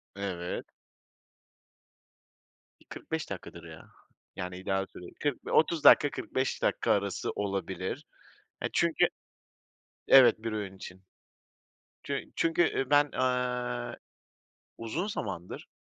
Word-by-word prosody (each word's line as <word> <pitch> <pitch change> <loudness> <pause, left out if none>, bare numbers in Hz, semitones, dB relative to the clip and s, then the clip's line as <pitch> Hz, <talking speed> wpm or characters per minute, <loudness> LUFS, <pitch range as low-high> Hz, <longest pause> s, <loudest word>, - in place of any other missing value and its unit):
Evet. 90 -3 -4 2.2
45 - - -5
dakikadır 85 - -8
ya. 80 -1 -12 0.4
Yani, 90 0 -5
ideal 95 +1 -1
süre. 90 - -10
40 145 -3 -2
bi - - -5
30 160 0 +3
dakika, 145 - +8
45 130 0 -2
dakika - - +1
arası 100 -2 0
olabilir. 100 - -3 0.6
E, - - +1
çünkü - - +3 1.0
Evet, 130 -2 +8
1 115 - -2
öğün 100 -3 -4
için. 95 0 -10 1.0
Çü - - -3
çünkü, 165 +1 +2
ııı, 135 - -1
ben, 145 0 +4
aaa, 125 -1 -1 0.8
uzun 130 - -3
zamandır, 100 - -5
115 Hz, 105 wpm, -30 LUFS, 95-130 Hz, 2.2 s, dakika